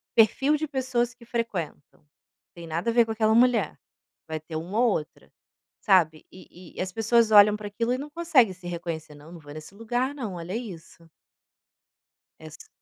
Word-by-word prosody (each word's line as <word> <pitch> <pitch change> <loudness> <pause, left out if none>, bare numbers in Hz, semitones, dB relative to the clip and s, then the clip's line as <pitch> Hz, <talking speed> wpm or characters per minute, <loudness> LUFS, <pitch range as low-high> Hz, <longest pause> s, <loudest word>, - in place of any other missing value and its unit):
perfil 265 +6 +4
de 310 - -3
pessoas 260 -3 -1
que 240 - -18
frequentam: 205 -13 -5 0.5
tem 170 -1 -10
nada 170 +8 -2
a - - 0
ver 235 0 +5
com 225 - -5
aquela 220 0 +2
mulher. 245 0 +3 0.5
Vai 160 -1 -4
ter 160 +1 -9
uma 180 +7 -3
ou 240 -2 +4
outra, 155 -5 -5 0.5
sabe? 165 -6 +3
E 185 -1 -15
e - - -2
as 185 0 -3
pessoas 225 +1 +2
olham 210 0 +8
para 210 -1 -7
aquilo 230 +4 -2
e - - -1
não 285 +3 -7
consegue 295 - +3
se 180 0 -17
reconhecer, 170 -3 -5
"não 150 +3 -14
não 170 - -10
vou 145 -1 -12
nesse 155 +5 -11
lugar 245 +5 -2
não, 225 -10 -5
olha 175 +3 -6
isso". 170 -7 -9 1.3
É 160 - -11
ass 155 - -14
210 Hz, 185 wpm, -26 LUFS, 170-240 Hz, 1.3 s, olham